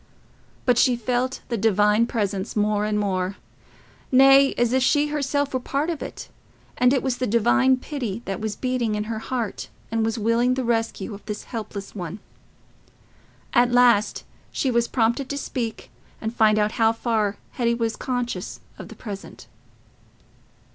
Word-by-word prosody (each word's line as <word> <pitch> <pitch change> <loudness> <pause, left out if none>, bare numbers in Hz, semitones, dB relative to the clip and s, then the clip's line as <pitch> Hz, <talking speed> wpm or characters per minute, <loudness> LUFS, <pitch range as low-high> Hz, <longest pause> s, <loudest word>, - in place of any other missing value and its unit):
But 245 -2 +3
she 250 - +4
felt 245 +2 -1
the 235 -3 -1
Divine 210 +2 +3
presence 200 -4 -2
more 210 0 +1
and 210 0 0
more—nay, 255 +7 +1
as 240 0 +2
if 260 - +3
she 290 +3 +3
herself 285 -1 -1
were 260 - +1
a - - -15
part 285 +6 -1
of 320 - -5
it, - - -7 0.5
and 250 0 +4
it 265 -2 +1
was 260 -2 -1
the 255 0 -1
Divine 255 +4 +3
pity 245 -6 -5
that 195 0 -4
was 215 -2 -3
beating 250 -4 -1
in 210 - -1
her 220 0 -4
heart 230 -3 -4 0.2
and 225 0 +1
was 225 +1 -1
willing 230 +3 +2
the 260 - -1
rescue 225 -3 -1
of 200 - -10
this 210 -1 -4
helpless 215 -4 -6
one. 180 -1 -6 1.4
At 245 -1 +4
last 240 -4 +4 0.3
she 265 - 0
was 235 0 +2
prompted 235 +3 0
to 285 - -3
speak 235 -5 -4 0.3
and 220 0 -4
find 215 -2 +4
out 210 0 +2
how 225 0 +5
far 220 -3 -1
Hetty 235 -2 0
was 230 -1 -1
conscious 245 -2 -3 0.2
of - - -8
the - - -11
present. 205 -4 -9
235 Hz, 165 wpm, -24 LUFS, 210-255 Hz, 1.4 s, how